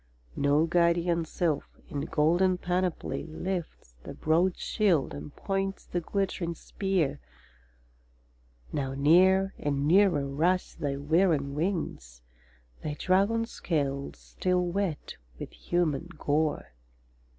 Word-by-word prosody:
No 145 +3 +3
guardian 170 0 +2
sylph, 160 -1 -2
in 140 - -4
golden 175 +5 +3
panoply, 180 -2 -2
Lifts 165 - -5
the - - -9
broad 170 +4 +2
shield, 180 - +1
and 70 +1 -7
points 195 0 -2
the 175 - -2
glittering 180 -2 -2
spear. 165 -7 -1 1.5
Now 135 -2 -2
near 185 +7 +4
and 140 -1 -1
nearer 175 -5 +4
rush 170 +7 0
thy 140 -2 -3
whirring 150 -1 +2
wings, 150 - -3 0.6
Thy 150 -1 -4
dragon 200 +5 +2
scales 140 -10 -2
still 180 -1 -1
wet 175 -3 -3 0.2
with - - -7
human 170 -3 -1
gore. 150 - -1
170 Hz, 105 wpm, -28 LUFS, 145-185 Hz, 1.5 s, near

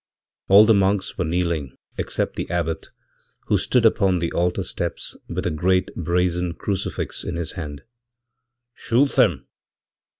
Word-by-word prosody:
All 100 +2 +8
the 115 - +5
monks 100 0 +1
were 90 - +1
kneeling 85 -5 -2 0.2
except - - -2
theabbot, 80 -2 -2 0.6
who - - +3
stood 125 -2 +2
upon 100 -4 +3
the 85 -1 -2
altar 90 +1 0
steps - - -4
with 90 +2 -3
a 85 - +1
great 90 +4 +1
brazen 90 0 0
crucifix 100 -3 -3
inhis 85 -1 -3
hand. 75 -3 -7 0.9
'Shoot 130 +5 +2
them!' - - +2
90 Hz, 130 wpm, -23 LUFS, 85-95 Hz, 0.9 s, All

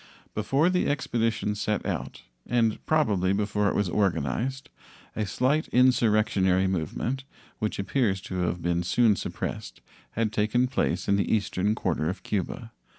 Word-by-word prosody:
Before 135 - +2
the 180 - +1
expedition 115 -6 0
set 105 0 -2
out, - - -4 0.2
and 115 -3 +1
probably 100 - +2
before 105 0 +1
it - - -2
was 100 - +1
organized, 95 - -1 0.4
a 105 -2 -1
slight 135 +10 +1
insurrectionary 105 -7 +3
movement, 95 - -2 0.4
which 110 - -2
appears 100 -1 0
to 95 -2 -5
have 90 -1 -1
been 85 0 +1
soon 110 +4 +3
suppressed, - - -5 0.3
had 110 -1 -1
taken 110 +4 +2
place 125 -8 -1
in 100 - +3
the 100 - 0
eastern 105 -1 +1
quarter 80 -7 -1
of 95 - -5
Cuba. 110 +3 -3
105 Hz, 145 wpm, -27 LUFS, 95-120 Hz, 0.4 s, insurrectionary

